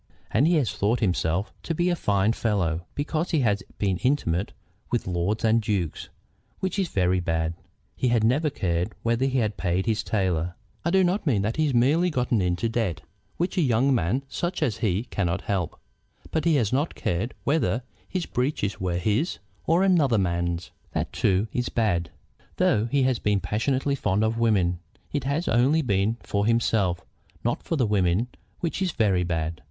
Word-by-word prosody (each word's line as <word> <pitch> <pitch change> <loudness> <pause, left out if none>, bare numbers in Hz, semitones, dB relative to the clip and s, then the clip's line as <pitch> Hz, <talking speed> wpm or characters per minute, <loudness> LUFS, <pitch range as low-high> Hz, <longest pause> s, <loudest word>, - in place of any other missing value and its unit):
And 135 +8 +3
he 175 - +4
has 140 -8 +1
thought 110 +5 +1
himself 90 -1 0
to 165 - -3
be 175 +2 +2
a - - +2
fine 105 - +2
fellow 90 -8 -1
because 155 +3 -1
he 160 -4 +2
has 105 -4 +2 0.2
been 95 -3 0
intimate 100 - 0 0.4
with 120 - -1
lords 95 +5 -1
and 115 +1 +4
dukes, 100 -7 -2 0.5
which 190 +1 -2
is 190 - +1
very 95 - +1
bad. 80 -1 -1 0.4
He 130 - 0
has 120 -2 +2
never 140 +8 +3
cared 90 -4 -1
whether 120 +3 +1
he 130 -4 +2
paid 95 -2 -1
his 110 -2 +1
tailor. 90 -4 -1 0.3
I 170 - +1
do 190 +2 +4
not 180 0 0
mean 105 -8 +2
that 110 +3 -1
he 155 - +3
has 140 -4 0
merely 150 +9 +4
got 125 -6 -1
into 95 -1 +1
debt, 115 -7 -1 0.4
which 180 +2 0
a - - +4
young 130 0 +3
man 120 +4 +1
such 175 +4 -2
as 115 -8 0
he 105 -2 0
cannot 95 -6 -1
help; 95 -5 -2 0.5
but 160 0 -1
he 165 -2 +4
has 120 -5 +1
not 145 +5 0
cared 95 +8 -2
whether 140 -5 +1 0.3
his 185 -2 -2
breeches 120 -8 -1
were 90 -2 0
his 105 - 0 0.3
or 170 +4 +4
another 155 - +4
man's. 85 -2 -1 0.2
That - - -2
too 95 +3 +2
is 125 0 -1
bad. 90 -7 0 0.5
Though 105 +1 +2
he 140 +2 +2
has 130 -2 +1
been 105 -1 +1
passionately 130 +9 0
fond 105 -6 +1
of 110 +1 0
women, 95 -7 +2 0.3
it 145 -3 -1
has 145 +5 -1
only 135 +8 +3
been 105 -1 +1
for 100 +1 0
himself, 105 -7 +1 0.4
not - - 0
for - - -2
the 130 -6 +2
women, 100 +2 +1 0.3
which 170 +1 -2
is 185 -3 0
very 100 -6 +2
bad. 80 -2 -2
110 Hz, 185 wpm, -25 LUFS, 95-140 Hz, 0.5 s, he